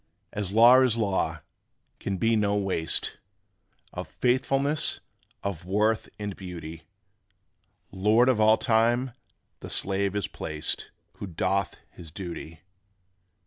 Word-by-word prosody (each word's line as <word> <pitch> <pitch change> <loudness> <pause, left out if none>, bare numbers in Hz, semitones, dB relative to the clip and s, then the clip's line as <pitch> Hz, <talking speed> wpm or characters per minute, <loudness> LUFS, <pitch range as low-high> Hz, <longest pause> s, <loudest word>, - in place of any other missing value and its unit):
As 100 -2 -3
law 120 +4 +7
is 125 -3 +2
law, 100 -4 -1 0.6
can 95 -1 -3
be 115 +3 +2
no 105 -1 +1
waste 95 -5 0 0.7
Of - - -5
faithfulness, 135 +4 +1 0.4
of 95 -4 -4
worth 105 +4 +1
and 105 -2 -5
beauty; 85 -4 -9 1.0
Lord 105 +6 +3
of 130 -4 +3
all 110 +1 +6
time 120 +2 +2 0.5
the - - -9
slave 100 0 0
is 105 - -1
placed 80 0 -3 0.3
Who 100 - -6
doth 95 +3 -1 0.2
his 85 -2 -12
duty. 85 -2 -8
100 Hz, 115 wpm, -27 LUFS, 95-115 Hz, 1.0 s, law